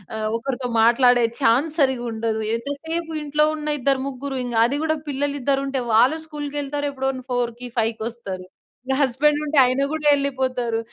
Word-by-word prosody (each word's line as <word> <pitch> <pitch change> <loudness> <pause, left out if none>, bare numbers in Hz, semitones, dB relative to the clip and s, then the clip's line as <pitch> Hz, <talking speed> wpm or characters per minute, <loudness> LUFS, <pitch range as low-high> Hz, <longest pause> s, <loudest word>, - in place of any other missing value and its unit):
ఆహ్, 215 0 -2
ఒకరితో 255 +1 -3
మాట్లాడే 245 +1 +5 0.2
చాన్స్ 280 +7 +2
సరిగ్గా 260 -4 +2
ఉండదు. 220 0 -2 0.2
ఎంతసేపు 320 +6 -4
ఇంట్లో 300 +1 +1
ఉన్న 300 0 -4
ఇద్దరు, 270 +1 +2
ముగ్గురు 275 0 -5
ఇంగ 240 -2 -4
అది 280 +4 0
కూడా 315 0 +1
పిల్లలు 285 0 -1
ఇద్దరుంటే 275 0 0
వాళ్ళు 250 +8 +5
స్కూల్‌కెళ్తారు. 290 -1 -3
ఎప్పుడో 265 0 -1
న్ - - -11
4:00కి 245 0 -2
ఫైవ్‌కొస్తారు. 220 -4 -3 0.4
ఇంగా 265 0 0
హస్బెండ్ 285 +3 +2
ఉంటే 300 0 -1
ఆయన 255 +2 +1
కూడా 310 -1 -1
ఎళ్ళిపోతారు. 260 -4 -1
265 Hz, 155 wpm, -22 LUFS, 240-285 Hz, 0.4 s, మాట్లాడే